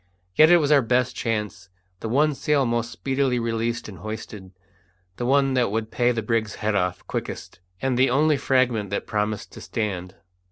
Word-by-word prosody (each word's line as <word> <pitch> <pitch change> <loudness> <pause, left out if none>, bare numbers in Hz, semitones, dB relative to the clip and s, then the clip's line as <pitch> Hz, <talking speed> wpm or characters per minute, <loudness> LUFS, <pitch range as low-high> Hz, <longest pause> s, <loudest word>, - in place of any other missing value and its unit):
Yet 155 +8 +6
it 175 - +8
was 150 -3 +1
our 145 -2 +6
best 125 +1 +1
chance; 105 -4 -3 0.3
the 110 - -5
one 150 +5 +3
sail 140 0 +1
most 115 -1 -1
speedily 135 -2 0
released 115 0 -2
and 100 -4 -10
hoisted, 105 -3 -7 0.7
the 120 - -2
one 135 0 +3
that 125 -4 +2
would 110 +1 -3
pay 125 0 +2
the 115 -2 -2
brig's 110 -1 -1
head 110 0 -1
off 90 -3 -1
quickest, - - -6 0.2
and 130 -2 +1
the 130 - +5
only 150 +4 +3
fragment 125 -6 +1
that 100 - -3
promised 105 0 -2
to - - -11
stand. 95 -5 -4
115 Hz, 185 wpm, -24 LUFS, 105-130 Hz, 0.7 s, it